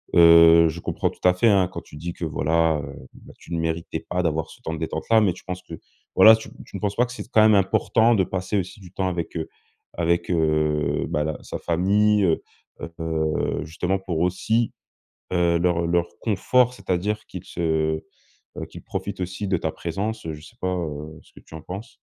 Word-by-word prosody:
heu, 85 -1 +8
je 80 +2 -6
comprends - - -1
tout - - -15
à 90 - +5
fait, 100 +6 +3
hein, 95 -3 +4
quand 95 - -7
tu 75 - -13
dis 85 +3 -5
que, - - -9
voilà, 80 +1 +1
heu, 70 -2 -10
bah - - -15
tu 85 - -10
ne 85 - 0
méritais 80 0 -2
pas 90 0 0
d'avoir 80 -2 -1
ce - - -15
temps 80 - -4
de 80 - -5
détente-là, 110 +7 +1
mais 100 -5 +2
tu 90 - -14
penses 90 0 -5
que, 85 - -12 0.4
voilà, 110 0 +9
tu 110 - -10
m - - -14
tu - - -8
ne - - -9
penses 100 -1 -1
pas 120 - +3
que 125 - -10
c'est 125 -4 -7
s - - -19
quand 110 -2 +4
même 110 0 +6
important, 110 +4 +3
de 95 - +3
passer 95 +2 -2
aussi 95 +2 -4
du 90 -2 -14
temps 95 -1 -1
avec, 85 -1 -4
heu, 80 -1 -4 0.4
avec, 85 0 0
heu, 75 -2 +1
bah 75 - 0
la 80 -1 -3
sa - - -5
famille? 100 +5 +2
Heu 85 -4 +2 0.6
heu, 80 -2 -1
justement 90 +4 -2
pour 90 -4 -3
aussi, 100 +6 +1 0.6
heu, 85 -2 +2
leur 85 -1 +1
leur 85 0 +1
confort, 125 +3 +2
c'est-à-dire 105 0 -2
qu'ils 90 - -8
se, - - -10 1.0
heu, - - -4
qu'ils - - -11
profitent 100 -1 -5
aussi 95 +3 -4
de 95 -1 +1
ta 80 -1 -2
présence, 100 +8 -4
heu, 80 - -3
je 75 - -13
sais 115 - -16
pas, 90 0 0
heu, 80 -2 -5
ce - - -24
que - - -14
tu - - -14
en 80 - -8
penses? 95 +7 -8
90 Hz, 225 wpm, -23 LUFS, 80-100 Hz, 1.0 s, voilà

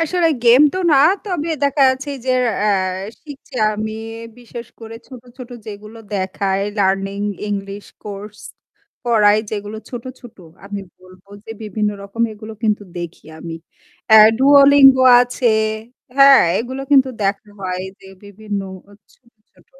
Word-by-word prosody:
আসলে 335 +1 +1 0.2
গেম 240 +4 +6
তো - - -2
না - - +5 0.3
তবে 355 -6 -3
দেখা 280 0 +2
যাচ্ছে 270 +2 -7 0.2
যের 255 -1 +1 0.2
অ্যা 210 0 +1 0.5
শিখছি 290 -4 -13 0.2
আমি 215 +1 -4 0.5
বিশেষ 240 -1 -10
করে 225 0 -10
ছোট, 255 -3 -12
ছোট 255 -1 -11 0.2
যেগুলো 215 +1 -10 0.2
দেখায় 195 0 -2 0.2
লার্নিং 195 0 0 0.3
ইংলিশ 200 0 -5 0.2
কোর্স 210 +1 -9 0.7
পড়ায় 215 -3 +3
যেগুলো 210 0 -6
ছোট, 240 -2 -7 0.2
ছোট 245 -3 -14 0.3
আমি 200 0 -6 0.2
বলবো 185 +1 -19 0.2
যে - - -11
বিভিন্ন 210 0 -2
রকম 200 +4 -4
এগুলো 215 +1 -10
কিন্তু 210 -2 0 0.2
দেখি 170 -2 -8
আমি। 165 0 -7 0.6
অ্যা 220 - +9 0.2
Duolingo 275 -1 +6 0.2
আছে 245 0 -3 0.7
হ্যাঁ? 275 0 +7 0.2
এগুলো 260 +3 -5
কিন্তু 270 -2 +5
দেখা 200 +1 -2
হয় 185 -1 -4 0.2
যে - - -16 0.2
বিভিন্ন 205 0 -6 0.3
অ - - -17 0.2
ছোট, 235 -3 -31 0.2
ছোট - - -27
220 Hz, 140 wpm, -18 LUFS, 200-260 Hz, 0.7 s, অ্যা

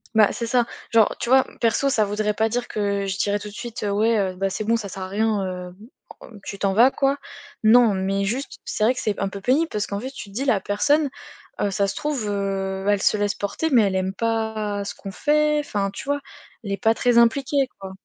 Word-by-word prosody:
Bah, 215 -2 +6
c'est 235 - -4
ça. 240 0 +2 0.3
Genre 225 -2 +4
tu 235 - -3
vois, 265 0 +6 0.2
perso, 235 +4 +2
ça 220 - +3
voudrait 210 +1 -1
pas 220 +1 +1
dire 245 +1 -2
que 200 -1 -1
je 190 0 -3
dirais 205 0 +1
tout 210 +1 -8
de - - -13
suite: 235 -1 -6
«Ouais, 220 +3 +2
heu, 190 -2 0
ben, 195 +1 -1
c'est 215 - -3
bon, 225 +2 +2
ça 215 -3 -4
sert 190 0 -6
à - - -5
rien, 210 0 0
heu, 180 -1 -6 0.7
tu 200 - -6
t'en 195 0 0
vas 235 +5 +6
quoi». 275 +1 0 0.5
Non, 225 -1 +6
mais 195 +1 -1
juste, 255 +7 -3
c'est - - -2
vrai 235 +4 +4
que - - -5
c'est 210 -2 -2
un 195 - -1
peu 200 0 -8
pénible 285 +9 +2
parce 210 -1 -2
qu'en 200 0 -4
fait 260 - -5
tu 265 -6 -9
te - - -16
dis: 270 - -2
«La 230 -7 +3
personne, 285 +10 +1 0.5
heu, 205 - +1
ça 200 0 +1
se 195 - -3
trouve, 285 -8 -2
heu, 195 -1 -2
elle 205 -1 +2
se - - +3
laisse 205 0 0
porter, 205 +10 -2
mais 245 -6 +5
elle 195 -2 0
aime 190 0 -1
pas 220 -2 -2
ce - - -5
qu'on 195 - -8
fait», 300 +6 +2
enfin, 205 -9 -2
tu 200 - -8
vois? 285 0 -1 0.4
Elle 200 - -5
n'est 200 - -1
pas 225 0 +2
très 245 0 +2
impliquée 270 +3 +2
quoi. 190 -1 -7
215 Hz, 245 wpm, -23 LUFS, 200-245 Hz, 0.7 s, Bah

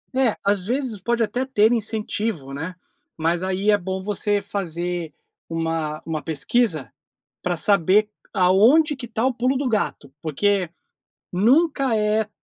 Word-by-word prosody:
É, 260 -4 +2
às 200 -2 +1
vezes, 250 -4 -1
pode 235 +1 +1
até 245 +4 -1
ter 235 -4 +3
incentivo, 215 - -2
né, 165 +6 -5 0.4
mas 170 +2 0
aí 190 +3 +1
é 205 - +4
bom 190 +1 -4
você 205 0 0
fazer 175 -4 -3 0.4
uma 165 -2 -2
uma 155 -2 -3
pesquisa, 160 - 0 0.5
para 175 -1 -1
saber 200 +3 +3 0.2
aonde 225 - +4
que 255 -2 -7
está 225 +1 -1
o 260 - +2
"pulo 255 +3 0
do 275 -1 -1
gato", 200 - -2
porque 180 +4 0 0.6
nunca 265 - +3
é 215 0 +1
205 Hz, 140 wpm, -22 LUFS, 175-230 Hz, 0.6 s, é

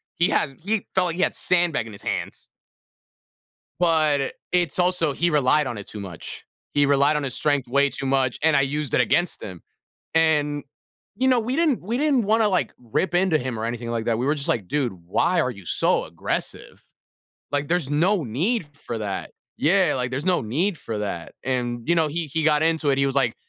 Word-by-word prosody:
He 170 - +2
had 135 -3 0
he 210 0 -1
felt 185 -1 +3
like 165 - -3
he 185 - -2
had - - 0
sandbag 175 -9 +1
in - - -9
his 100 - -10
hands. - - -4 1.3
But 155 -5 +2 0.2
it's 175 -1 +1
also 175 -5 +2
he 170 +4 +1
relied 145 -1 +3
on 120 -4 -4
it 100 - -8
too 105 - -8
much. 95 -5 -8 0.3
He 145 0 +4
relied 140 +2 +3
on 150 - -1
his 130 -3 -3
strength 145 -4 0
way 140 +2 +3
too 140 - -6
much, 130 -1 +1
and 160 -1 +3
I 140 - +5
used 145 -1 -2
that - - +4
against 175 +8 +1
him. 90 -4 -8 0.5
And, 150 -3 +2 0.5
you 260 +1 +2
know, 250 -2 +4
we 250 +5 -2
didn't 315 - +2
we 225 +6 -2
didn't 285 -5 +2
wanna, 220 +1 +3
like, 185 - 0
rip 125 +9 -2
into 175 -3 +3
him 125 -3 -4
or 110 - -3
anything 115 0 -4
like 115 -1 -2
that, 115 -1 0
we 125 - -1
were 150 - +2
just 140 -2 -3
like, 100 -6 -1
"Dude, 140 -7 0
why 95 - 0
are 130 - 0
you 100 -5 -11
so - - +1
aggressive? - - -5 0.7
Like, 145 0 -1
there's 170 -5 0
no 170 +4 +2
need 165 - 0
for 120 -5 -6
that." 100 -3 -4 0.3
Yeah, 180 0 +3
like, 125 -1 -2
there's 140 +6 -3
no 185 -1 +2
need 160 - -1
for 110 -2 -5
that, 95 -5 -5
and, 120 -2 -2
you 170 - +3
know, 160 -2 +3
he 165 +2 -2
he 160 +3 -2
got 150 -1 +3
into 160 -3 +1
it, 135 - +1
he 140 - +3
was 135 0 -1
like, 120 -5 +2
145 Hz, 215 wpm, -23 LUFS, 125-175 Hz, 1.3 s, I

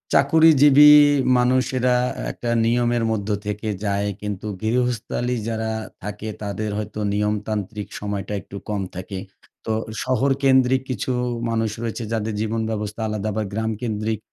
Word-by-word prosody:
চাকুরিজীবী 150 0 +7 0.5
মানুষেরা 125 0 +2 0.4
একটা 120 - -5 0.2
নিয়মের 120 0 +1
মধ্য 105 -1 -2 0.2
থেকে 105 +1 -4 0.2
যায়। 100 0 0
কিন্তু 105 0 -4
গৃহস্থালি 125 +1 -1
যারা 110 -1 -2 0.3
থাকে, 105 +1 -6 0.2
তাদের 105 +1 -3
হয়তো 105 0 -5
নিয়মতান্ত্রিক 105 0 -2
সময়টা 105 0 -4
একটু 100 - -12
কম 105 -2 -1
থাকে। 95 +1 -6 0.5
তো 110 - 0 0.3
শহরকেন্দ্রিক 130 0 +3
কিছু 130 +1 -2 0.4
মানুষ 115 -1 0
রয়েছে 115 0 -3
যাদের 110 -1 -1
জীবনব্যবস্থা 110 -1 -2
আলাদা 105 -1 -3
আবার 110 +1 -1
গ্রাম 110 +1 -1
কেন্দ্রিক 110 -2 -2
110 Hz, 120 wpm, -22 LUFS, 105-125 Hz, 0.5 s, চাকুরিজীবী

